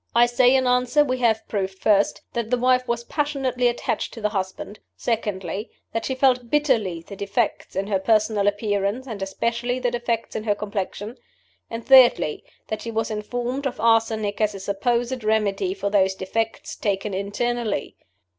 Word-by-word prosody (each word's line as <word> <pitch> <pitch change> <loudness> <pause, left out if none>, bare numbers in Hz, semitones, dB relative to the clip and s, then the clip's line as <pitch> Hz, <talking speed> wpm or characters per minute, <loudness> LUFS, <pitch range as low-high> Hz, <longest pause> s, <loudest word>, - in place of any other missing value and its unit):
I 240 +1 +7
say, 245 +2 +4
in 260 -1 +3
answer, 250 +4 +3
we 255 -2 -1
have 225 -3 +1
proved, 190 -2 -2
first, 205 0 +2
that 235 -2 -2
the 250 - +2
wife 255 +1 +2
was 235 0 -1
passionately 265 -3 0
attached 240 - -2
to 230 - -8
the 210 - +1
husband; 195 +1 -4 0.2
secondly, 205 -3 -2 0.2
that 225 - -2
she 265 - -1
felt 255 -2 +2
bitterly 230 - +1
the 200 - -10
defects 200 +3 -2
in 195 +1 0
her 200 -2 0
personal 215 0 +2
appearance, 205 +3 0
and 220 -6 -7
especially 235 +5 -1
the 250 -1 0
defects 235 -1 -2
in 215 - -2
her 205 -2 +2
complexion; 205 +2 -4 0.5
and, 230 0 -6
thirdly, 255 - +6 0.2
that 215 - -4
she 230 - -5
was 225 0 -2
informed 245 +6 -2
of 255 - -6
arsenic 225 -2 +2
as 210 -1 +1
a - - -6
supposed 240 +5 -1
remedy 215 - +1
for 200 - -2
those 190 -2 +3
defects, 225 +4 -3
taken 200 0 -2
internally. 205 0 -2
225 Hz, 170 wpm, -23 LUFS, 205-245 Hz, 0.5 s, I